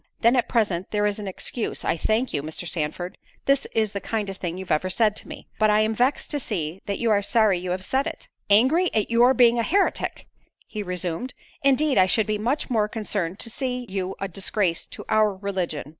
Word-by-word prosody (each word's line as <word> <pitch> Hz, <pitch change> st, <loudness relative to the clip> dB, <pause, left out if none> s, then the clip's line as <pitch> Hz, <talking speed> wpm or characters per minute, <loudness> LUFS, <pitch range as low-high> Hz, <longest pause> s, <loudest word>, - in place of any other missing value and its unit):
"Then, 235 Hz, +2 st, +5 dB
at 245 Hz, -, +1 dB
present, 200 Hz, -6 st, 0 dB
there 210 Hz, -1 st, 0 dB
is 205 Hz, 0 st, 0 dB
an 205 Hz, -, -5 dB
excuse—I 210 Hz, +3 st, -2 dB
thank 220 Hz, +9 st, 0 dB
you, 145 Hz, -, 0 dB
Mr. 155 Hz, +4 st, -6 dB
Sandford—this 175 Hz, -, -2 dB
is 220 Hz, -2 st, 0 dB
the 200 Hz, -, -4 dB
kindest 205 Hz, -4 st, -3 dB
thing 175 Hz, -1 st, -3 dB
you 190 Hz, -, -6 dB
ever 185 Hz, +4 st, +1 dB
said 210 Hz, +2 st, +2 dB
to -, -, -4 dB
me. -, -, -9 dB
But 215 Hz, -1 st, +4 dB
I 210 Hz, 0 st, +4 dB
am 215 Hz, +1 st, +1 dB
vext 250 Hz, +6 st, 0 dB
to 295 Hz, -, -1 dB
see 180 Hz, -, -3 dB
that 200 Hz, -, -1 dB
you 235 Hz, -2 st, +1 dB
are 205 Hz, -1 st, +4 dB
sorry 210 Hz, -3 st, +3 dB
you 180 Hz, 0 st, -5 dB
have 185 Hz, +1 st, -2 dB
said 270 Hz, +3 st, 0 dB
it." -, -, -6 dB, 0.2 s
"Angry 265 Hz, -, +4 dB
at 215 Hz, +1 st, +1 dB
your 245 Hz, +3 st, +5 dB
being 240 Hz, -1 st, +5 dB
a -, -, +3 dB
heretic!" 390 Hz, -, 0 dB, 0.4 s
he 215 Hz, -, -5 dB
resumed—"Indeed 245 Hz, -, -1 dB
I 185 Hz, -, +5 dB
should 215 Hz, +3 st, +3 dB
be 215 Hz, -1 st, -1 dB
much 250 Hz, +8 st, 0 dB
more 220 Hz, -5 st, +1 dB
concerned 205 Hz, -5 st, -3 dB
to -, -, 0 dB
see 250 Hz, 0 st, -3 dB
you 190 Hz, -1 st, -3 dB
a 195 Hz, -, -2 dB
disgrace 190 Hz, -1 st, 0 dB
to -, -, -10 dB
our 215 Hz, -2 st, +3 dB
religion." 190 Hz, -6 st, -3 dB
210 Hz, 210 wpm, -24 LUFS, 185-235 Hz, 0.4 s, Then